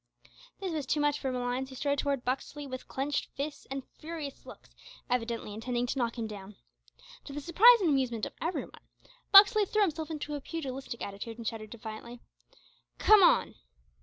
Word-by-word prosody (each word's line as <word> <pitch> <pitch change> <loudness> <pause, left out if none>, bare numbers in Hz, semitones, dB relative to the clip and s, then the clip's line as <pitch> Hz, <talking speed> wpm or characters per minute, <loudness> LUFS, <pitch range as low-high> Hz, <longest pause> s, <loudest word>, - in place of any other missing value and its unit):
This 380 -3 -3
was 300 -4 -3
too 300 - +1
much 290 0 +1
for 265 - -2
Malines, 250 +1 -2
who 260 - -10
strode 280 +1 0
towards 280 -3 -1
Buxley 275 +3 -3
with 255 -2 -7
clenched 280 +2 -2
fists 285 +2 -5
and 270 0 -5
furious 310 -3 -7
looks, - - -13 0.4
evidently 230 -3 -2
intending 240 +3 -2
to 250 - -3
knock 235 0 -1
him 230 - -2
down. 205 -1 -9 0.7
To 280 - -8
the 295 - -4
surprise 415 +10 +6
and 350 - +2
amusement 250 -5 0
of - - -8
every 335 +1 -1
one, - - -14 0.5
Buxley 410 +2 +9
threw 425 +2 +2
himself 320 -4 -2
into 300 -1 -5
a 290 - -4
pugilistic 270 -6 -5
attitude, 205 +3 -6
and 230 - -8
shouted 215 -1 -4
defiantly, 235 +1 -8 0.8
"Come 430 -1 +7
on!" 355 - +4
270 Hz, 180 wpm, -30 LUFS, 240-310 Hz, 0.8 s, Buxley